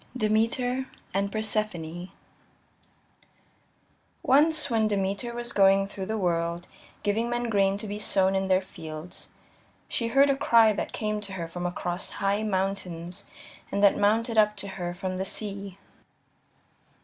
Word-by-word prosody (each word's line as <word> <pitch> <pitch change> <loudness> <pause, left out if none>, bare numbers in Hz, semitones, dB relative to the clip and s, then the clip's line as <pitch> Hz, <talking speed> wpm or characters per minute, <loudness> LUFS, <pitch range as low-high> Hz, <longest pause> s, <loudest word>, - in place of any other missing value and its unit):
Demeter 245 +4 +1 0.3
And 200 +1 0
Persephone 200 -6 -2
I - - -22 2.1
Once 305 +4 +4
when 225 -3 +2
Demeter 200 +3 -1
was 240 0 -5
going 195 0 +5
through 195 -1 -6
the 220 +1 -1
world, 170 -2 -1 0.4
giving 220 +3 0
men 240 0 -1
grain 195 -1 +3
to 210 - -5
be 205 0 -4
sown 190 -2 +2
in 190 0 0
their 190 0 +3
fields, 160 -2 -9 0.6
she 230 - -2
heard 275 +4 +5
a - - +1
cry 230 -5 +5
that - - -3
came 215 -1 -2
to 200 -2 -7
her 170 -3 -4
from 175 +1 -4
across 175 +1 -4
high 200 +1 0
mountains 190 -3 -3 0.5
and 200 +1 0
that 200 - +6
mounted 220 +2 +2
up 210 0 +4
to 200 0 -6
her 175 -2 -4
from 185 0 -3
the 190 - -1
sea. 200 -1 -5
200 Hz, 150 wpm, -27 LUFS, 190-220 Hz, 2.1 s, that